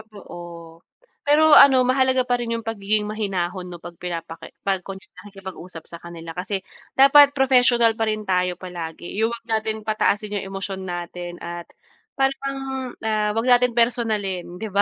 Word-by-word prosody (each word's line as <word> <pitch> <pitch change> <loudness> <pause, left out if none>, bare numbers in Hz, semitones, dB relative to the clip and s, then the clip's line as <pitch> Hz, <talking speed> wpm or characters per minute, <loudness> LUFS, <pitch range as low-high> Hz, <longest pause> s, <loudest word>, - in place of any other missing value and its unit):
Oo, 195 - -10 0.9
pero 300 +2 +5
ano 265 -3 +8
mahalaga 260 0 +2
pa 245 -1 0
rin 230 -1 -2
yung 230 - -5
pagiging 215 -1 -1
mahinahon 190 -4 -3
'no 175 -1 -10
pag 170 - -10
pinapake 170 -2 -7
pag 195 -2 +1
nakikipag-usap 190 -3 -10
sa 170 - -10
kanila 170 -1 -9
kasi 185 +3 -4 0.3
dapat 280 +1 +7
professional 245 -3 +4
pa 225 - +1
rin 215 0 -1
tayo 180 -2 0
palagi 175 +1 -7
yung 230 +1 +1
huwag 230 - -13
natin 220 -1 -2
pataasin 210 -1 0
yung 195 - -7
emosyon 195 -1 -5
natin 175 0 -6
at 175 0 -6 0.5
parang, 275 0 -1 0.5
ah, 215 -1 0
wag 225 +2 0
nating 245 -1 +4
personalin, 215 -7 0
'di 220 +2 -5
ba. 200 - +4
210 Hz, 155 wpm, -22 LUFS, 180-235 Hz, 0.9 s, ano